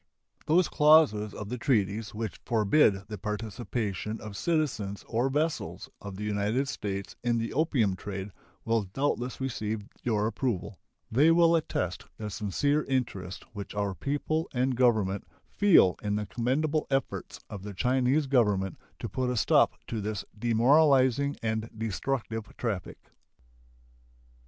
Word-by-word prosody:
Those 175 +4 +4
clauses 150 -9 +5
of 105 - -7
the 125 +1 -4
treaties 105 -5 0
which 110 -3 -4
forbid 110 -3 +3
the 105 -2 -7
participation 105 0 -3
of 105 -2 -8
citizens 125 -11 -1
or 120 +3 +1
vessels 150 +3 -2
of 100 -2 -7
the 105 - -6
United 105 +6 0
States 100 -6 -4
in 120 -1 +2
the 115 0 -2
opium 130 - +2
trade 95 +1 -6 0.3
will 115 0 +2
doubtless 125 +4 -2
receive 110 -5 -3 0.2
your 105 -3 +1
approval. 110 -4 -2 0.3
They 140 +8 +5
will 170 0 +5
attest 90 - -2
the 105 -1 -5
sincere 145 +10 0
interest 110 -9 -2
which 100 -1 -7
our 100 -1 -1
people 145 - -2
and 130 +1 +1
Government 110 -6 +2 0.3
feel 185 - +6
in 105 -1 -1
the 105 0 -1
commendable 135 - 0
efforts 135 -1 -2
of 100 - -7
the 100 0 -7
Chinese 130 +6 +2
Government 105 -8 +1 0.2
to - - -5
put 130 -1 -2
a 125 - -1
stop - - +4
to 115 -2 -4
this 105 0 -3
demoralizing 130 +4 +4
and 110 0 -1
destructive 110 0 -3
traffic. 105 -7 -3
115 Hz, 135 wpm, -29 LUFS, 105-135 Hz, 0.3 s, feel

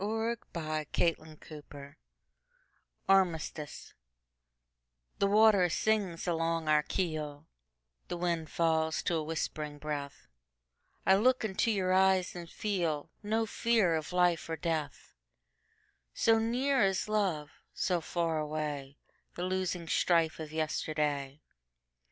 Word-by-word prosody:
1900. 225 +3 -1
By 170 - -4
SophieJewett 155 +2 0
1502 150 -2 -12 1.1
Armistice 170 -6 0 1.3
THE 200 - +3
WATER 205 -3 +5
sings 200 -3 0
along 165 -1 0
our 150 0 +5
keel, 155 -4 -3 0.6
The 175 - -4
wind 170 -2 -1
falls 160 -1 +1
to - - 0
a 160 -2 0
whispering 155 -1 -4
breath;I 60 - -5
look 250 +2 +3
into 215 +2 0
your 190 -4 +1
eyes 190 -1 +3
and 175 -1 -7
feelNo 205 +4 -2
fear 225 -6 +2
of 160 +1 -2
life 180 -2 +2
or 165 - -1
death; 155 -2 -3 1.0
So 225 0 +4
near 255 +4 +1
is 195 -1 +1
love, 190 -9 0 0.2
so 180 -2 0
far 165 -1 -1
awayThe 150 -2 -4 0.5
losing 185 -2 -2
strife 165 -1 +2
of 155 -1 -6
yesterday. 150 -2 -2
165 Hz, 110 wpm, -31 LUFS, 155-190 Hz, 1.3 s, WATER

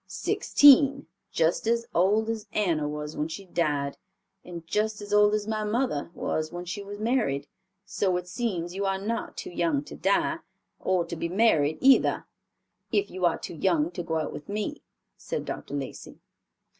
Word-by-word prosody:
"Sixteen; 280 - +5 0.3
just 165 +6 +1
as 235 0 +1
old 205 +5 +3
as 225 -2 -3
Anna 165 -8 +1
was 150 0 -5
when 150 - -1
she 165 +5 -7
died, 145 -6 -1 0.4
and 170 -2 -9
just 210 +4 -1
as 205 0 -6
old 210 0 +5
as 210 0 -3
my 215 -1 -1
mother 210 - -1
was 155 0 -2
when 175 0 -6
she 180 +4 -5
was 200 +1 -8
married; 215 - 0 0.4
so 185 -3 0
it 180 0 -6
seems 175 -4 -3
you 195 +1 -3
are 195 0 0
not 220 +4 -4
too - - -6
young 165 -5 0
to - - -10
die, 200 - +1 0.4
or 185 -2 +1
to 170 - -6
be 170 +1 -3
married 170 -7 +3
either, 270 0 +4 0.7
if 405 - +1
you 185 -1 -1
are 170 - 0
too - - -7
young 165 -1 +1
to 175 - -5
go 160 -1 -2
out 155 - -3
with 150 - -9
me," 210 +8 -3 0.4
said - - -4
Dr. - - -5
Lacey. - - -7
185 Hz, 180 wpm, -27 LUFS, 165-215 Hz, 0.7 s, Sixteen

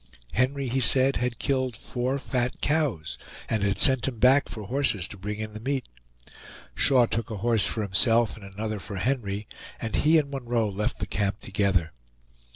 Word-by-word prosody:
Henry, 135 +3 +1
he 130 +2 0
said, 130 +3 +4
had 125 -1 -2
killed 130 -4 -1
four 125 +4 -2
fat 125 -2 -2
cows, 115 - 0 0.3
and 110 -2 0
had 100 0 +1
sent 130 +4 +4
him 125 -3 -3
back 130 +4 +4
for 110 - -7
horses 110 -5 0
to - - -8
bring 105 +2 -5
in 110 0 -5
the 110 - -7
meat. 135 +3 -2 0.9
Shaw 130 -3 +4
took 115 -1 -3
a 110 - -4
horse 115 +1 +2
for 110 - -2
himself 115 +4 +3
and 110 - -13
another 105 +2 -5
for 100 +2 -8
Henry, 105 -2 -2 0.3
and 110 -2 -2
he 160 +2 +4
and 145 -2 0
Munroe 120 -5 -1
left 105 +2 -2
the - - -3
camp 100 +3 -1
together. 95 -5 0
115 Hz, 180 wpm, -26 LUFS, 105-130 Hz, 0.9 s, said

